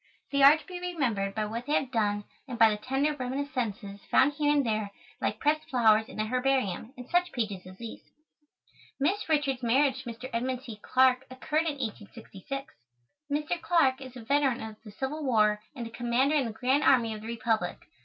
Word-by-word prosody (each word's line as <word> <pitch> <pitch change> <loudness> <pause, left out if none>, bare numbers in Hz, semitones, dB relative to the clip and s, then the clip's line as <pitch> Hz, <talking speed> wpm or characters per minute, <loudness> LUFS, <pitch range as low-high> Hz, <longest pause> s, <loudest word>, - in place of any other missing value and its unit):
They 280 0 +1
are 280 +3 +9
to 315 - -14
be 365 -1 -7
remembered 245 - -1
by 215 -1 0
what 230 +4 -5
they 295 - 0
have 265 -4 +1
done 205 -3 0 0.2
and 245 -3 -5
by 225 -1 +6
the 210 - -1
tender 270 +7 0
reminiscences 250 -6 -3
found 275 +3 +4
here 295 0 +1
and 285 -2 +2
there 215 -2 -1 0.3
like - - -1
pressed 305 +1 +1
flowers 220 -3 +4
in - - -10
a 215 - +1
herbarium, 250 -3 0
in 250 0 -9
such 355 +3 +1
pages 205 -6 -3
as 185 0 -12
these. 230 0 -8 1.0
Miss 370 +8 0
Richards' 285 -4 +1
marriage 260 +2 +2
to 240 - -7
Mr. 235 +2 -7
Edmund 250 +2 -2
C. 225 -6 -9
Clarke 260 +1 +3
occurred 305 +5 -1
in 295 -2 -2
1866. 230 +2 -7 0.6
Mr. 305 +4 -1
Clarke 275 -7 +2
is 260 -1 -9
a 235 - -9
veteran 275 -1 +1
of 220 -1 -8
the 215 - -11
Civil 265 +8 -4
War 210 -5 +3
and 240 -3 -5
a 230 - -8
Commander 240 +4 +1
in 280 -4 +2
the 230 - -3
Grand 255 +6 +1
Army 235 -5 +4
of 215 - -7
the 220 - -8
Republic. 225 -5 -1
255 Hz, 200 wpm, -29 LUFS, 220-280 Hz, 1.0 s, are